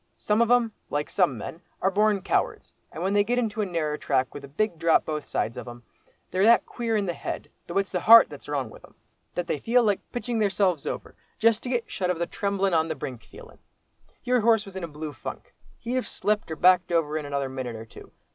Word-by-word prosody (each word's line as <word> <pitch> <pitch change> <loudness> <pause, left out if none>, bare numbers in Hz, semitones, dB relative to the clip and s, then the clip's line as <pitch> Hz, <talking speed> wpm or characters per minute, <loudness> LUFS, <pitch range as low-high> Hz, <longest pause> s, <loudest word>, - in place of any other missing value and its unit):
Some 210 +2 +1
of 235 - +3
'em, 240 -2 +4 0.2
like 145 0 -2
some 175 - +2
men, 160 - -7 0.2
are 190 - +1
born 205 -1 +2
cowards, - - -1 0.2
and 165 - -6
when 195 +2 0
they 205 0 +4
get 240 +4 -1
into 225 -3 0
a 205 - -1
narrer 155 -4 -2
track 130 -2 0
with 145 - -8
a - - -8
big 170 +4 -2
drop 165 0 +3
both 155 -1 -4
sides 115 - -2
of - - -7
'em, 120 0 -10 0.5
they're 185 - 0
that 230 +2 +6
queer 230 -2 -2
in 205 - 0
the 175 - -1
head—though 170 +2 -6
it's 195 -1 0
the 180 - 0
heart 230 +6 +9
that's - - -11
wrong - - -2
with - - -14
'em—that 175 - -9
they 150 - -2
feel 240 - +3
like 205 -3 +2
pitching 240 -1 -2
theirselves 195 -6 +1
over, - - -5 0.2
just 230 -1 +3
to 250 - -5
get 240 -2 -1
shut 185 -3 -2
of 180 - 0
the 170 - -1
tremblin' 195 0 -1
on 160 -1 +3
the 160 - -3
brink 125 -5 -6
feelin'. - - -15 0.6
Your 250 -1 +2
horse 225 -1 +3
was 195 -1 -11
in 190 - -5
a - - -2
blue 150 -1 -7
funk; - - -8 0.2
he'd 235 +1 -5
have 255 -1 -1
slipped 210 0 -1
or 160 - -3
backed 180 +2 +4
over 160 -3 +1
in 150 -2 -3
another 140 -1 -1
minute 130 -3 -5
or 110 0 -8
two. - - -14
185 Hz, 240 wpm, -26 LUFS, 155-220 Hz, 0.6 s, heart